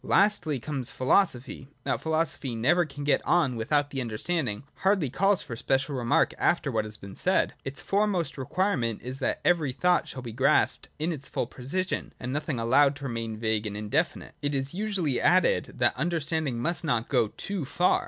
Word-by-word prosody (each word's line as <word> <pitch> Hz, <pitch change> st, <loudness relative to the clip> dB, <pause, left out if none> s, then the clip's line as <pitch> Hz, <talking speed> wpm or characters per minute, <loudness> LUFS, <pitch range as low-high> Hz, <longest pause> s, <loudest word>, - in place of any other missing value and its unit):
Lastly 175 Hz, -8 st, +2 dB
comes 135 Hz, -1 st, -2 dB
Philosophy. 130 Hz, -2 st, +1 dB, 0.2 s
That -, -, -1 dB
Philosophy 160 Hz, -6 st, -1 dB
never 155 Hz, +10 st, +3 dB
can 145 Hz, -1 st, -8 dB
get 145 Hz, -, +2 dB
on 160 Hz, -8 st, +2 dB
without 145 Hz, +6 st, +1 dB
the 135 Hz, -, -2 dB
understanding 120 Hz, 0 st, -2 dB
hardly 190 Hz, -9 st, +2 dB
calls 195 Hz, +6 st, +2 dB
for 115 Hz, -, -6 dB
special 135 Hz, +4 st, 0 dB
remark 120 Hz, -2 st, +2 dB
after 160 Hz, -5 st, +2 dB
what 110 Hz, -2 st, 0 dB
has 105 Hz, 0 st, -6 dB
been 100 Hz, -1 st, -10 dB
said. -, -, +1 dB
Its 135 Hz, +1 st, -6 dB
foremost 200 Hz, -4 st, 0 dB
requirement 130 Hz, -, -1 dB
is 130 Hz, +2 st, -6 dB
that 130 Hz, -, -1 dB
every 165 Hz, -6 st, +3 dB
thought 180 Hz, +7 st, +2 dB
shall 130 Hz, -, -6 dB
be 120 Hz, -, -6 dB
grasped 130 Hz, +5 st, +2 dB
in 160 Hz, +3 st, -1 dB
its 140 Hz, -4 st, -5 dB
full -, -, -2 dB
precision, 140 Hz, +10 st, -3 dB
and 125 Hz, +1 st, -4 dB
nothing 150 Hz, -2 st, -2 dB
allowed 135 Hz, +5 st, +4 dB
to 145 Hz, -, -9 dB
remain 115 Hz, -4 st, -3 dB
vague 110 Hz, -1 st, 0 dB
and 105 Hz, 0 st, -5 dB
indefinite. 135 Hz, +11 st, -1 dB
It 145 Hz, -1 st, -1 dB
is 135 Hz, +2 st, -1 dB
usually 185 Hz, -, -1 dB
added 185 Hz, +1 st, +4 dB
that 120 Hz, -1 st, +2 dB
understanding 155 Hz, -3 st, -1 dB
must 170 Hz, +9 st, -1 dB
not 120 Hz, -7 st, 0 dB
go 110 Hz, -, +2 dB
too 190 Hz, -, -4 dB
far. 175 Hz, +6 st, +2 dB
140 Hz, 185 wpm, -27 LUFS, 120-170 Hz, 0.2 s, allowed